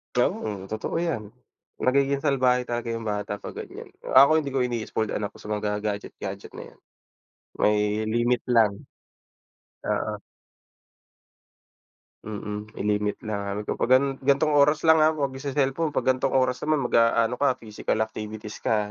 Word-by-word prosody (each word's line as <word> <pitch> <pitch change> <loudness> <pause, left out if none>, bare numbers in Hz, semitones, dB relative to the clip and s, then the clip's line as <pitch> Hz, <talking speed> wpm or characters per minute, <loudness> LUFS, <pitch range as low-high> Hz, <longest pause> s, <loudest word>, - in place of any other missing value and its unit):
Tama, 100 -3 0
totoo 110 +7 -3
'yan. 140 -12 -2 0.5
Magiging 140 +1 +2
salbahe 125 -3 +3
talaga 120 -1 -3
yung 115 0 -4
bata 105 -1 -2
'pag - - -8
ganyan. - - -9
Kung - - -6
ako, 140 +2 +9
hindi 140 -2 -4
ko 135 - -1
ini-spoiled 110 -2 -2
anak 105 -1 -2
ko - - -18
sa 105 - -9
mga 105 0 -1
gadget-gadget 100 -1 -5
na - - -7
'yan, - - -24 0.8
may 105 - +4 0.3
limit 120 +2 +1
lang. 115 -4 +4 1.2
Oo. - - -1 2.1
Mm. 105 0 -5
May - - -5 0.2
limit 105 0 -3
na 100 -2 -3
ano 105 - -3
to, - - -4
'pag 125 - +4
ano, 135 +1 +2
"Gantong 140 +3 +2
oras 150 +2 +4
lang, 160 -1 +6
ha, 155 +1 +4
'wag 140 -3 -1
magce-cellphone. 140 +3 -1
'Pag - - -1
gan'tong 135 - 0
oras 130 -1 +2
naman, 155 -2 +2
mag-aano 115 +1 +3
ka, 140 -3 +3
physical 110 0 -2
activities 110 -1 -6
ka, 105 -2 0
120 Hz, 155 wpm, -25 LUFS, 105-140 Hz, 2.1 s, ako